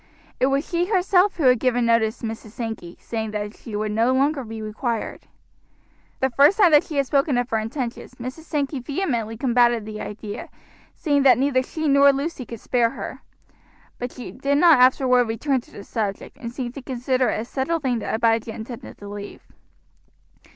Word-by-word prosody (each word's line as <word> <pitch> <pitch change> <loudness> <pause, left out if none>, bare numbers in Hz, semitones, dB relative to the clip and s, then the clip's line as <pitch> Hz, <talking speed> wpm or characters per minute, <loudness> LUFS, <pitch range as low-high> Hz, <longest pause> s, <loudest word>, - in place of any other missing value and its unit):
It 260 - +3
was 275 +2 0
she 350 0 0
herself 380 -1 +3
who 325 - -1
had 250 -2 +5
given 245 -1 +1
notice 230 -1 +2
to - - -7
Mrs. 220 -1 -6
Sankey, 220 -8 -6
saying 220 -1 -4
that 210 0 -4
she 220 - -8
would 210 0 -1
no 225 +4 +2
longer 275 +1 +1
be 225 -1 -7
required. 220 +2 -4 0.9
The 265 0 +2
first 285 +10 +5
time 380 -6 +6
that 295 -1 +6
she 310 - -7
had 280 -1 +2
spoken 275 0 +1
of 245 -1 0
her 220 - +2
intentions, 240 +2 -5
Mrs. 255 +6 -7
Sankey 285 -3 -2
vehemently 245 - -2
combated 240 -2 +2
the 215 0 -6
idea, 210 0 -7 0.5
saying 285 -3 +1
that 270 -2 +6
neither 265 0 +2
she 315 +4 -4
nor 280 0 +6
Lucy 275 -1 -4
could 230 - -8
spare 240 0 +1
her; - - -7 0.8
but 245 0 -4
she 250 - -8
did 280 +2 0
not 330 -3 +6
afterward 250 -1 +5
return 250 +4 -1
to - - -22
the 200 - -10
subject, 205 -2 -4
and 235 -4 -6
seemed 245 -1 -5
to 275 - -8
consider 255 0 0
it - - -1
a - - -6
settled 295 +6 -2
thing 250 -3 0
that - - -2
Abijah 225 0 +1
intended 230 +1 -8
to 205 - -10
leave. 205 0 -8
250 Hz, 195 wpm, -23 LUFS, 225-280 Hz, 0.9 s, time